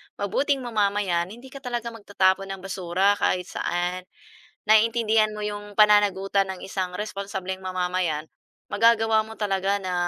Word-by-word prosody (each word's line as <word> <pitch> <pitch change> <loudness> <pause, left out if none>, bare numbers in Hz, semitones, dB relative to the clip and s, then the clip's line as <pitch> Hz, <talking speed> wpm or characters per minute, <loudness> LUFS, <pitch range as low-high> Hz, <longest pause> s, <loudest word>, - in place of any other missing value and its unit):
mabuting 270 +7 0
mamamayan, 200 -6 0
hindi 240 +7 -12
ka 275 - -9
talaga 240 -3 -4
magtatapon 195 -3 +1
ng 195 -1 -7
basura 195 +1 +1
kahit 180 -1 0
saan. 180 +1 -2 0.6
Naiintindihan 220 0 +4
mo 210 0 -5
'yong 205 0 -7
pananagutan 200 -2 +4
ng 190 - -6
isang 190 -1 -3
responsableng 195 -2 -5
mamamayan, 180 -4 -1 0.4
magagawa 225 0 +3
mo 220 +1 -12
talaga 195 -1 0
na, 185 -2 -4
200 Hz, 130 wpm, -25 LUFS, 185-220 Hz, 0.6 s, Naiintindihan